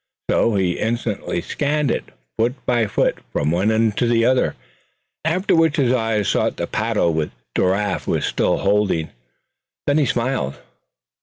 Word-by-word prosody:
So 115 - +2
he 95 -3 0
instantly 110 -6 -2
scanned 145 - 0
it, - - -2 0.3
foot 120 +3 +1
by 120 -3 +2
foot, 100 - 0
from 75 +4 0
one 90 +5 +2
end 110 -1 +2
to 120 - +2
the 115 -1 +3
other; 130 0 +2 0.7
after 175 +5 +1
which 165 -2 +3
his 130 -4 +3
eyes 110 -4 0
sought - - +1
the - - -1
paddle 85 - 0
which 80 -1 -1 0.3
Giraffe 100 +3 0
was - - 0
still - - +1
handling. 100 -5 +1 0.8
Then 145 +2 +2
he 145 - +2
smiled. 120 - -1
115 Hz, 155 wpm, -21 LUFS, 100-130 Hz, 0.8 s, the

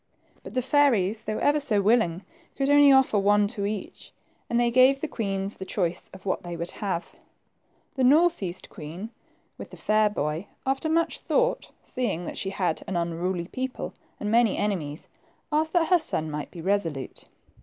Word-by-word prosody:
But - - -11
the 255 - +1
fairies, 230 -7 +2
though 215 0 -2
ever 295 +1 +2
so 235 -8 +4
willing, 200 -4 +2 0.3
could 275 +1 +1
only 290 -1 +7
offer 265 -6 +4
one 205 +1 +3
to 205 -3 -3
each, 210 -2 -6 0.4
and 235 - +1
they 240 0 +2
gave 255 +2 +5
the 315 - -3
queens 195 -5 -3
the - - -6
choice 180 -3 -2
of 190 0 -13
what 185 - -1
they 175 -1 -6
would 170 +1 -4
have. 190 -4 -4 0.8
The 265 -3 -1
north 315 +5 +4
east 180 -2 -3
queen, 175 +9 -8 0.5
with - - -8
the - - -12
fair 215 0 +2
boy, 155 -1 -3 0.2
after 270 +4 0
much 330 +1 +1
thought, - - 0
seeing 210 - -3
that - - -5
she 195 - -2
had. 180 -4 -1
an 190 - -3
unruly 170 +1 -2
people 260 0 -4 0.3
and 210 - -2
many 230 -2 +3
enemies, 165 -8 -2 0.4
asked 310 +1 +1
that 340 -3 +2
her 360 -2 +5
son 160 - -1
might 150 -1 -5
be 170 - -9
resolute. 165 -9 -2
210 Hz, 180 wpm, -26 LUFS, 180-265 Hz, 0.8 s, only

